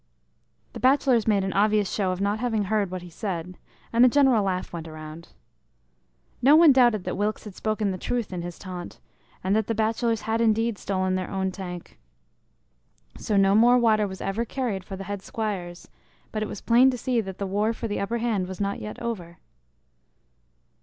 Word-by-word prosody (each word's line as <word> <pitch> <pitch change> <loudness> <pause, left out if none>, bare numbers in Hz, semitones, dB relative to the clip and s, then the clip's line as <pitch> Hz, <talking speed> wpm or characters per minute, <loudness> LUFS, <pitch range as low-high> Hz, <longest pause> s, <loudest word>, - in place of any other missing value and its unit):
The - - -7
bachelors 260 -3 +3
made 205 -3 +3
an 190 - -2
obvious 210 0 +3
show 190 -3 0
of 185 - -4
not 200 +2 0
having 225 -3 0
heard 205 -1 0
what 185 -1 -6
he 175 - -10
said, 180 -2 -5 0.4
and 235 +1 +5
a 255 - +7
general 265 -4 +4
laugh 185 -2 -2
went 165 -1 -6
around. 155 +1 -9 1.1
No 280 +4 +7
one 325 -1 +8
doubted 240 -7 +4
that - - -3
Wilkes 210 +2 -2
had 210 - -9
spoken 215 0 -1
the 185 - -5
truth 235 -3 -2
in 175 - -3
his 175 0 -7
taunt, 180 -2 -8 0.4
and 190 +2 +1
that 220 -1 +1
the 225 - -1
bachelors 225 +1 0
had 225 +1 -1
indeed 225 -1 +1
stolen 185 -1 -1
their 185 -1 -2
own 190 -1 -1
tank. 180 -2 -8 1.2
So 210 - 0
no 195 0 +4
more 240 +4 +6
water 215 -3 +3
was 190 -1 -8
ever 195 +4 -1
carried 235 -6 -3
for 190 - -7
the 195 - -7
head 200 0 -5
squires, 190 -6 -5 0.4
but 215 - -3
it 215 - -2
was - - -7
plain 245 +3 +5
to 255 - -2
see 245 0 0
that 190 -3 -8
the 200 - -3
war 205 +3 0
for 230 - -4
the 205 - -3
upperhand 220 -2 -1
was 190 0 -8
not 200 0 -2
yet 210 - -7
over. 180 -8 -5
205 Hz, 195 wpm, -25 LUFS, 190-230 Hz, 1.2 s, one